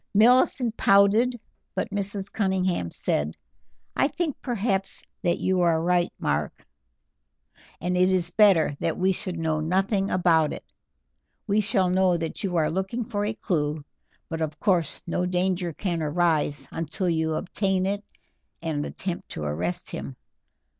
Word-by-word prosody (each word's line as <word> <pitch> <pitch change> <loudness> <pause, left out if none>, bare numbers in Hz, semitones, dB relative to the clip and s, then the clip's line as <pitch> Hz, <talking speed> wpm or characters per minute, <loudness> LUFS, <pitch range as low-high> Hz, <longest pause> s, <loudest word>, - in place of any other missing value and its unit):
Millicent 240 +1 +4
pouted, 210 +5 +4 0.4
but - - -2
Mrs. 200 -1 -3
Cunningham 190 - 0
said: 75 -1 0 0.6
"I - - +3
think, 320 -2 -2
perhaps, 200 -5 -1 0.2
that 175 -3 +1
you 185 -1 +1
are 170 -2 +3
right, 175 +1 +1
Mark, - - -2 1.1
and 180 +2 -1
it 185 +1 +4
is 175 -2 +2
better 185 -7 +4
that 165 - -1
we 190 +1 +2
should 185 -1 0
know 160 -1 0
nothing 195 +5 +1
about 165 -4 +3
it; - - -9 0.8
we 210 +1 +2
shall 190 -3 +1
know 185 -1 +3
that 165 +4 -5
you 185 -3 -1
are 155 -2 +2
looking 190 +7 -2
for 205 -3 -2
a 215 +1 -2
clew, 150 -5 -2 0.4
but 165 -1 -4
of 155 -1 -3
course 175 -7 0
no 175 +1 -1
danger 180 -1 0
can 170 +1 -3
arise 150 -3 +1
until 165 +3 -3
you 160 -2 0
obtain 190 +1 0
it 200 +1 -2 0.6
and 160 -3 -2
attempt 185 -2 -5
to 75 - -6
arrest 85 +5 -3
him. - - -6
180 Hz, 145 wpm, -25 LUFS, 160-200 Hz, 1.1 s, Millicent